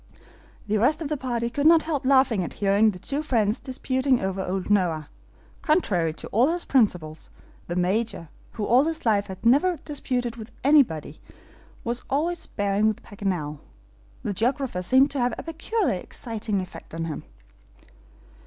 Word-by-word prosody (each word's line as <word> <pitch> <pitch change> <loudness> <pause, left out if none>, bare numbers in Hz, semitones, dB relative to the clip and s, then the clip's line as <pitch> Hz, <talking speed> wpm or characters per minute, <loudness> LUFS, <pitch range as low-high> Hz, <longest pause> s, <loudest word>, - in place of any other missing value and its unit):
The 215 0 +1
rest 300 +9 +2
of 290 - -4
the 305 - 0
party 240 -4 -2
could 285 +4 +2
not 330 -1 +6
help 290 -5 -2
laughing 260 -7 +4
at - - -5
hearing 200 +2 +3
the 195 - -5
two 280 +10 -3
friends 230 -7 +1
disputing 260 0 0
over 190 0 -2
old 190 +2 -3
Noah. 165 -7 +1 0.5
Contrary 200 - +2
to - - -7
all 245 +9 +3
his 350 0 -2
principles, 180 - +1 0.4
the 175 - -3
Major, 185 -1 -1 0.2
who 215 - -3
all 250 +6 +4
his 325 -3 -3
life 205 -3 +2
had 190 +2 -9
never 295 +9 +4
disputed 250 -5 -2
with 220 0 -9
anyone, 255 - +3 0.7
was 240 +1 -1
always 330 +5 0
sparring 205 -3 0
with 220 - -1
Paganel. 180 -8 -3 0.6
The 205 - -2
geographer 240 -1 0
seemed 260 +9 +4
to 280 - -2
have 245 0 +1
a - - -6
peculiarly 330 - -1
exciting 215 0 -4
effect 185 -2 -10
on 165 0 -3
him. 160 -2 -5
230 Hz, 160 wpm, -25 LUFS, 195-275 Hz, 0.7 s, not